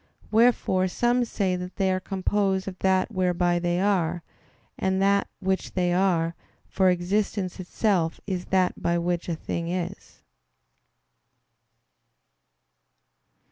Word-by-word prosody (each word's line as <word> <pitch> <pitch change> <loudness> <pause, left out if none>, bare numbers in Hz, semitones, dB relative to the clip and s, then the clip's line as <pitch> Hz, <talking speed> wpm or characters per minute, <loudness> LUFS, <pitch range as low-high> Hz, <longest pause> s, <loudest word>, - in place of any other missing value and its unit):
Wherefore 215 -5 +3
some 240 +6 +1
say 195 -5 -1
that 180 0 -6
they 190 -1 +1
are 185 - 0
composed 190 0 -1
of 185 -1 -6
that 190 +2 +2
"whereby 180 -2 +1
they 175 0 0
are" 175 -4 +1 0.5
and 190 0 0
that 200 +1 +3
"which 190 0 -2
they 180 -1 +1
are"; 175 -3 +2 0.3
for 190 -1 +2
existence 185 +1 -1
itself 180 -2 0
is 185 -3 -3
that 185 -1 +1
by 170 0 +1
which 175 0 -2
a 170 - 0
thing 165 +1 -4
is. 180 +2 -5
185 Hz, 120 wpm, -25 LUFS, 175-195 Hz, 0.5 s, Wherefore